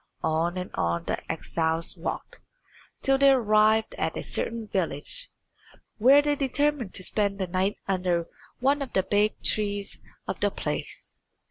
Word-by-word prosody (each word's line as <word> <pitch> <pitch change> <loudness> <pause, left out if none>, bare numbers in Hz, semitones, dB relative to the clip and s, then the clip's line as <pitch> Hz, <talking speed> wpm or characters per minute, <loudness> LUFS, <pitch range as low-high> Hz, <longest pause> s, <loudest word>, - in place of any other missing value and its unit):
On 165 +3 0
and 180 0 -4
on 85 0 0
the - - -3
exiles 160 0 -1
walked, - - -5 0.6
till 270 0 +3
they 275 0 +7
arrived 220 -3 +4
at - - -1
a - - -4
certain 230 -1 -2
village, 190 - -3 0.7
where 270 +6 +7
they 290 0 +2
determined 285 -4 0
to 185 - 0
spend 200 0 0
the 190 - -1
night 185 +3 0
under 180 -3 0 0.3
one 280 +3 +2
of 275 - -5
the 190 - +2
big 205 +2 +1
trees 205 -1 0 0.3
of - - -3
the - - +2
place. - - -6
205 Hz, 150 wpm, -27 LUFS, 180-260 Hz, 0.7 s, they